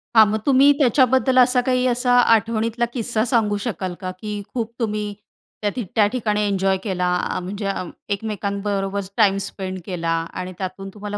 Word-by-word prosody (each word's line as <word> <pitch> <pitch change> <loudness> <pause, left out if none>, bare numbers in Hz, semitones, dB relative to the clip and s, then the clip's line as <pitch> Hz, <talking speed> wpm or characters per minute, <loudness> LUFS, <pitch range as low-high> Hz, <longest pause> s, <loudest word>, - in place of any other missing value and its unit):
हा 220 - +9
मग 215 +1 -1
तुम्ही 275 +1 +6
त्याच्याबद्दल 260 0 +3
असा 250 0 +5
काही 255 0 +1
असा 245 0 +1
आठवणीतला 230 0 +2
किस्सा 230 -2 -1
सांगू 220 -4 +1
शकाल 190 -6 -3
का? 185 -1 -3
की 210 -1 -4
खूप 230 -2 -2
तुम्ही 210 -2 -2 0.5
त्या 210 - +1
ठी 250 - -2
त्या 215 - +5
ठिकाणी 210 -2 -1
एन्जॉय 195 -1 +1
केला, 185 -4 -1
आ 180 +1 0
म्हणजे 200 +3 -5
अं, 190 -3 -3 0.2
एकमेकांबरोबर 200 -1 -2 0.2
टाईम 200 -3 +4
स्पेंड 190 -2 -6
केला. 170 -3 -2 0.2
आणि 185 0 -5
त्यातून 190 +1 -5
तुम्हाला 205 0 -5
210 Hz, 165 wpm, -21 LUFS, 195-235 Hz, 0.5 s, हा